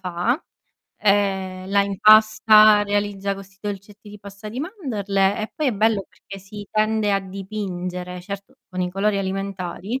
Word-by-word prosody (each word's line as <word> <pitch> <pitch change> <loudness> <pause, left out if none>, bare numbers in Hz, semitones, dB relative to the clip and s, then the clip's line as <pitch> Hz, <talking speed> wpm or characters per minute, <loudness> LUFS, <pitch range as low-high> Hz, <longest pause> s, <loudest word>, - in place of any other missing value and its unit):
fa, 185 - -1 0.6
ehm, 190 -2 0
la 200 0 +3
impasta, 215 +1 +6
realizza 205 -1 -1
questi 195 -1 -13
dolcetti 205 +1 -7
di 205 -1 -12
pasta 200 +1 -10
di 240 +5 -5
mandorle 205 - -1
e 215 - -6
poi 305 - -2
è - - 0
bello 215 -1 +1
perché 195 0 -12
si 205 +2 -10
tende 215 -1 +1
a 195 - +3
dipingere, 185 -2 -5
certo 200 +2 -8 0.2
con 185 - -4
i 180 0 -1
colori 200 +1 +1
alimentari; 195 +3 -4
200 Hz, 150 wpm, -22 LUFS, 195-215 Hz, 0.6 s, impasta